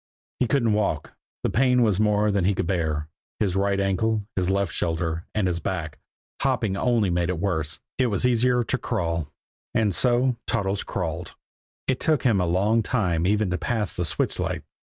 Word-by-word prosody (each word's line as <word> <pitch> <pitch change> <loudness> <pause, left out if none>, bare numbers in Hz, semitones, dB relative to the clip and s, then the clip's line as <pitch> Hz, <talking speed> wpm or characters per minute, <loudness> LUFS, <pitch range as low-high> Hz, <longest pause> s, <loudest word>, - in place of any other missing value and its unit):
He 125 - +2
couldn't 115 -2 +2
walk, 100 -8 -1 0.3
the - - 0
pain 125 0 +3
was 105 -4 +2
more 105 0 +3
than 100 -2 +1
he 100 +1 +2
could - - -1
bear 80 -4 -1 0.3
his 95 -4 0
right 100 0 +1
ankle, 100 +2 0
his 90 -1 0
left 100 -4 0
shoulder, 80 0 -2
and 105 -3 +1
his 90 -2 0
back 80 -3 -4 0.4
hopping 100 -4 +1
only 115 -3 +2
made 85 0 0
it 90 - -1
worse 80 -5 -1 0.2
it 130 - +4
was 105 +1 +1
easier 125 0 +3
to 130 - -1
crawl. 85 - -2 0.4
And 110 -4 +2
so 125 +6 +2
Toddles 100 0 0
crawled. - - -4 0.5
It 130 - +1
took 155 -6 +1
him 110 -7 +3
a 90 - 0
long 100 +6 +2
time 90 -8 0
even 105 -1 +1
to 90 - -1
pass 110 -5 -1
the 90 - -1
switch 80 - 0
light. - - -2
100 Hz, 185 wpm, -25 LUFS, 90-115 Hz, 0.5 s, it